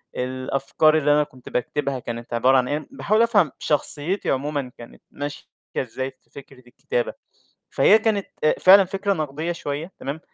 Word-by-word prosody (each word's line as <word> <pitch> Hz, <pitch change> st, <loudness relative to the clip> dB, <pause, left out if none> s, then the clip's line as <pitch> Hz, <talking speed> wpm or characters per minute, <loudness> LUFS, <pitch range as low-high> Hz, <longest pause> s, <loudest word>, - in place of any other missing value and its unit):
الأفكار 135 Hz, +4 st, +1 dB
اللي 150 Hz, -1 st, +2 dB
أنا 150 Hz, 0 st, +4 dB
كُنت 130 Hz, -4 st, -13 dB
باكتبها 135 Hz, +1 st, -2 dB
كانت 120 Hz, 0 st, -7 dB
عبارة 130 Hz, +3 st, +4 dB
عن 125 Hz, -1 st, +1 dB
إيه، 150 Hz, +1 st, -3 dB
باحاول 220 Hz, -4 st, +1 dB
أفهم 205 Hz, -, +3 dB
شخصيّتي 150 Hz, +5 st, 0 dB
عمومًا 140 Hz, -1 st, -2 dB
كانت 120 Hz, -, -13 dB
ماشية 145 Hz, 0 st, -6 dB, 0.3 s
إزاي 130 Hz, +2 st, -3 dB
في 130 Hz, -, -35 dB
فكرة 135 Hz, -2 st, -14 dB
الكتابة، -, -, -3 dB, 0.6 s
فهي 220 Hz, -, +5 dB
كانت 215 Hz, -3 st, 0 dB, 0.2 s
آآ 155 Hz, -, +4 dB
فعلًا 195 Hz, +1 st, +8 dB
فكرة 195 Hz, +2 st, -1 dB
نقدية 155 Hz, 0 st, -3 dB
شوية، 160 Hz, +2 st, -5 dB
تمام، 145 Hz, +4 st, -5 dB
145 Hz, 155 wpm, -23 LUFS, 130-185 Hz, 0.6 s, فعلًا